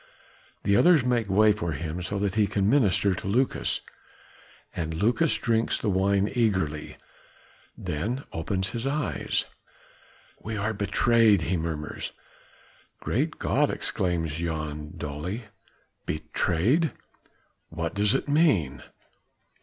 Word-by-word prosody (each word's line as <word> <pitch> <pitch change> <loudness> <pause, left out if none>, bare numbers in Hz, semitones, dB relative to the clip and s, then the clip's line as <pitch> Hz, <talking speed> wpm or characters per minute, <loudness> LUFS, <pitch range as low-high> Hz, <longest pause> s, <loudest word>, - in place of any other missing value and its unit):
The 100 - +3
others 165 - +5
make 120 -4 +1
way 105 +3 +5
for 95 -6 -2
him 80 +4 -4
so 100 +3 -3
that 100 -1 0
he 105 0 +3
can 100 -1 0
minister 100 -6 +3
to 90 - -6
Lucas. 125 +7 +1 0.9
And 80 -1 -3
Lucas 120 - +2
drinks 115 0 +1
the 105 - -1
wine 100 +1 +2
eagerly, 95 - 0 0.8
then 100 - -2
he 135 - -9
opens 95 +3 -1
his 120 +2 -3
eyes. 135 - -1 1.0
"We 110 0 -4
are 110 +2 -1
betrayed," 105 0 +3
he 90 +3 0
murmurs. 80 -2 -4 0.9
"Great - - -1
God!" - - +1
exclaims 80 -4 -1
Jan 75 -3 -4
dully. 80 +10 -4 0.6
"Betrayed!" 95 - +1 0.8
"What 80 0 -3
does 105 +3 +2
it 135 - -1
mean?" 105 - +2
100 Hz, 120 wpm, -26 LUFS, 80-115 Hz, 1.0 s, others